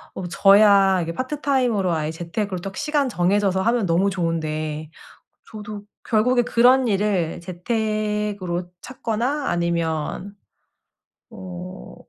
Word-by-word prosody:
어 - - -5
뭐 180 - -4
저야 195 0 +5
이게 165 0 -3
파트타임으로, 255 - 0
아예 155 -2 -1
재택으로 175 +3 -4
딱 195 +1 -7
시간 295 -3 0
정해져서 190 -1 +1
하면 230 +1 +1
너무 180 +3 +2
좋은데 155 -4 -3 0.6
저도 210 -1 -8 0.2
결국에 245 +2 +2
그런 250 +2 +4
일을 195 -5 0
재택으로 210 -1 -2
찾거나 250 +4 -2
아니면 170 +2 -2 1.0
어. 185 -3 -9
195 Hz, 260 characters per minute, -22 LUFS, 175-220 Hz, 1.0 s, 저야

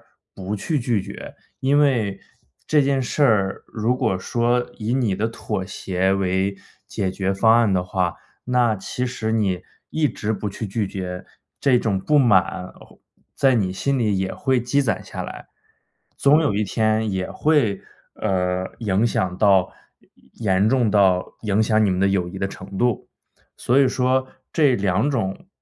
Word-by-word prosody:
绝。 - - -30 1.6
因 140 +2 +3
为 115 -9 +1 0.5
这 150 -1 +4
件 135 -1 +1
事 140 +4 0
儿 100 -7 +2
如 115 +3 -1
果 110 -8 0
说 120 +4 0
以 110 +3 -2
你 120 -7 +1
的 110 +4 -1
妥 105 -4 -4
协 95 0 -1
为 95 0 0 0.3
解 95 - -2
决 95 0 -1
方 110 +3 +4
案 115 -4 +3
的 90 -1 +1
话， 90 -1 -1 0.3
那 125 -3 +2
其 125 +6 -4
实 110 -3 -3
你 95 -5 0 0.3
一 155 -1 +1
直 110 -3 -3
不 105 - -4
去 110 - -5
拒 100 0 -2
绝 90 -1 -6 0.3
这 135 -3 +4
种 100 -5 0
不 150 +8 +2
满， 95 -6 +2 0.6
在 135 -2 +3
你 95 -5 0
心 140 +8 -1
里 105 -5 +1
也 95 0 -1
会 130 -2 +1
积 140 +4 +1
攒 110 -7 -1
下 - - -6
来。 - - -9 0.7
总 145 +3 +5
有 145 -8 +1
一 105 +2 0
天 110 +1 0
也 95 -1 -2
会， 140 -11 +1 0.3
呃， 90 -2 -1
影 105 0 +1
响 90 -5 -1
到 100 -3 +4 0.6
严 95 -4 +1
严 105 - +4
重 120 -4 +2
到 95 -3 +3 0.2
影 105 0 +1
响 110 0 +2
你 105 - +3
们 90 0 0
的 100 - +3
友 95 -2 0
谊 95 +2 -8
的 95 - -1
程 95 0 -9
度。 120 -2 0 0.5
所 125 +3 +1
以 135 - +5
说 130 +1 +1 0.3
这 145 -6 +4
2 100 +5 +1
种， 115 - -3
105 Hz, 175 characters per minute, -22 LUFS, 95-125 Hz, 1.6 s, 总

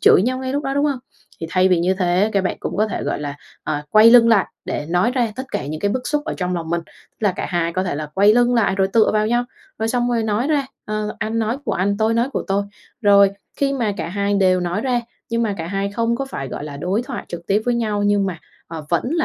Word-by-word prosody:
chửi 185 - +6
nhau 255 +3 0
ngay 260 0 -3
lúc 285 +2 -2
đó, 270 0 -1
đúng 285 +1 +2
hông? 280 -4 0 0.4
Thì 165 - -3
thay 185 0 +3
vì 180 -2 +3
như 185 +2 +2
thế 185 +3 +1
các 195 -1 +1
bạn - - -1
cũng - - -4
có 215 +2 +2
thể, - - -4
gọi - - -2
là, 145 -1 -5 0.3
ờ, 150 -1 -2
quay 215 +2 +7
lưng 235 -1 +7
lại 215 -5 +4 0.2
để 150 - -3
nói 180 +8 +2
ra 235 -5 0
tất 260 - -3
cả - - -2
những 155 +2 -5
cái 200 - +1
bức 250 +3 -2
xúc 295 -1 -1
ở - - -3
trong 180 -1 -2
lòng 165 -1 -4
mình, 170 0 +1
tức - - -24
là 190 - +3
cả - - -3
hai 170 -2 0
có 185 - 0
thể 180 - -2
là 150 +1 -4
quay 205 +3 +5
lưng 245 0 +3
lại 220 -4 +2
rồi 190 0 +1
tựa 225 -2 +4
vào 215 0 +2
nhau, 240 +2 +1 0.3
rồi 220 +1 -1
xong 245 +1 0
rồi 230 -2 +1
nói 220 +4 0
ra, 290 -3 +1 0.2
ờ, 215 0 -3
anh 220 +1 -2
nói 230 +4 -1
của - - -1
anh, 200 +2 0
tôi 220 +1 +1
nói 235 +3 +1
của - - -1
tôi. 200 +1 +1 0.4
Rồi, 200 -1 +6 0.3
khi 275 -1 +1
mà 230 -6 0
cả 170 - -4
hai 200 +2 -1
đều 185 -2 +3
nói 175 +4 -1
ra 250 -1 0 0.3
nhưng 230 0 +1
mà 210 -3 0
cả 160 - -4
hai 195 +2 -2
không 230 +1 0
có 275 - -2
phải, 135 - -6
gọi - - -6
là, 145 -2 -7
đối 185 +10 -1
thoại 255 -1 -6
trực 170 0 -7
tiếp 205 +2 +2
với 245 -1 +1
nhau 215 -3 -1
nhưng 205 -1 +2
mà, 180 -3 -4 0.3
ờ, 160 -2 -7
vẫn 170 - +2
là 330 - +1
205 Hz, 285 wpm, -20 LUFS, 180-235 Hz, 0.4 s, quay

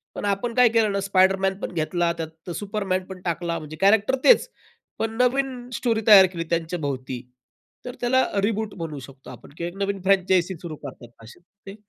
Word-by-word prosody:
पण - - -4
आपण 205 +4 -1
काय 250 -2 +6
केलं 225 -2 +2
ना 200 - -1
स्पायडरमॅनपण 195 0 +1
घेतला, 170 +1 0
त्यात 160 +1 -8
सुपरमॅनपण 190 -3 -3
टाकला. 170 0 -2
म्हणजे 155 0 -9
कॅरेक्टर 205 +5 +4
तेच - - +5 0.5
पण 225 - -1
नवीन 250 -1 0
स्टोरी 230 -2 0
तयार 200 -3 +9
केली 165 - -3
त्यांच्याभोवती, 145 -7 -3 0.6
तर 250 +1 -6
त्याला 260 +2 +3 0.2
रिबूट 215 0 -1
म्हणू 155 -4 -5
शकतो 135 +1 -13
आपण - - -12
किंवा 170 - -3
एक 175 - -14
नवीन 200 -1 -2
फ्रँचायझी 190 -1 +2
सुरू 165 -3 -6
करतात 120 -5 -12
असे 115 - -14 0.3
ते 195 - -7
190 Hz, 165 wpm, -24 LUFS, 165-220 Hz, 0.6 s, तयार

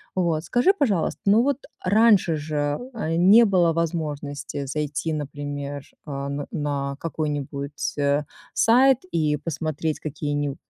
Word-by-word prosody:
Вот, 165 -4 0
скажи, 245 - +3
пожалуйста, 220 - 0
ну 210 +4 +5
вот 280 0 0 0.2
раньше 200 -4 +4
же, 145 -1 -2
э, 165 -8 -2
не 200 +7 +7
было 180 -5 +3
возможности 145 -4 -3
зайти, 150 +2 -2
например, 145 -1 -5 0.2
э, 140 -1 -4 0.2
на 140 -2 -2
какой-нибудь, 145 -3 -4
э, 145 +1 +2 0.3
сайт 255 +3 +5
и 155 -3 +1
посмотреть 155 0 -3
какие-ниб 145 -2 -3
155 Hz, 120 wpm, -24 LUFS, 145-180 Hz, 0.3 s, не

